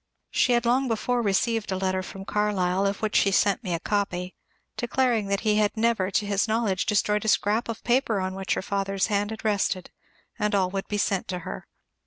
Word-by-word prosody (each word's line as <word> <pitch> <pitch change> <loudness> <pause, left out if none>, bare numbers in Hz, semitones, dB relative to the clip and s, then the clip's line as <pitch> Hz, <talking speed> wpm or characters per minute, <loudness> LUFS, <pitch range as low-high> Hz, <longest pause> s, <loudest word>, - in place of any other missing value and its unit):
She 250 - +3
had 240 0 +2
long 255 +3 +2
before 240 +2 0
received 220 +1 0
a 190 - 0
letter 185 0 0
from 195 +1 -9
Carlyle, 200 -2 +1
of 200 +2 -3
which 215 - -1
she 200 - +5
sent 200 +3 +2
me 180 -4 -1
a - - -3
copy, 185 -2 -2 0.4
declaring 240 -3 +1
that 200 0 0
he 210 -1 +2
had 210 0 +1
never 220 -4 +1
to 205 +2 0
his 200 +1 +1
knowledge 220 -4 0
destroyed 210 0 +1
a - - -4
scrap 215 +2 +2
of 230 - -5
paper 240 -4 +2
on 185 0 -2
which 190 0 -2
her - - -3
father's 195 -1 -1
hand 205 +1 +1
had 220 0 -7
rested, 200 -3 0 0.5
and 210 0 +1
all 185 -2 +1
would 195 0 -3
be 210 - -2
sent 195 -2 0
to 180 -1 -3
her. - - -7
205 Hz, 215 wpm, -26 LUFS, 190-220 Hz, 0.5 s, she